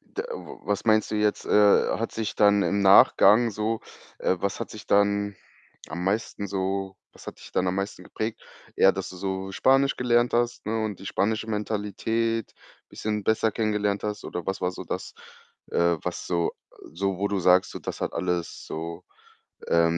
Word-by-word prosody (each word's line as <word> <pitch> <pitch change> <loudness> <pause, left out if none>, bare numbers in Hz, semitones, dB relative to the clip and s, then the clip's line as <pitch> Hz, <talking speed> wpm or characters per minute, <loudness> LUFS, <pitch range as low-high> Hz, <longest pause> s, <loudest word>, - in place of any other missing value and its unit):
d 420 - -6
w 480 -1 -8
was 105 -1 -1
meinst 110 -1 +3
du 110 - -1
jetzt, 105 -1 +1
äh, 105 -1 +4
hat 115 - -3
sich 110 -2 -3
dann 105 -1 +5
im 100 - +1
Nachgang 105 +3 +6
so 110 +2 -2 0.4
äh, 95 - +1
was 100 +4 -2
hat 115 - -4
sich 110 - -10
dann 100 0 +2 0.5
am 85 +4 -5
meisten 105 +1 -1
so 95 0 -2 0.2
was - - -16
hat - - -8
dich - - -13
dann 95 - +1
am 90 - 0
meisten 100 -1 -4
geprägt? 110 0 -5 0.3
Eher, 95 - +6
dass 95 -1 -5
du 95 - -10
so 95 +1 -3
Spanisch 135 +7 +3
gelernt 120 -1 +2
hast, 120 0 0
ne, 110 0 -1
und 105 -3 -4
die 95 - -9
spanische 110 +3 -1
Mentalität 110 +2 -2 0.4
bisschen 105 -1 -3
besser 110 0 +2
kennengelernt 105 -2 0
hast 105 0 -4
oder 90 -2 -5
was 95 - -2
war 90 - 0
so - - -8
das, - - -5 0.6
äh, 85 0 +3
was 90 - -4
so 85 -1 0 0.4
so 95 +2 -2
wo 100 - 0
du 100 -2 -1
sagst, 90 +1 +4
so, - - -6
das - - -6
hat - - -2
alles 90 -2 -3
so, 85 +2 -6 0.7
ähm, 85 0 +3
100 Hz, 185 wpm, -26 LUFS, 95-110 Hz, 0.7 s, Nachgang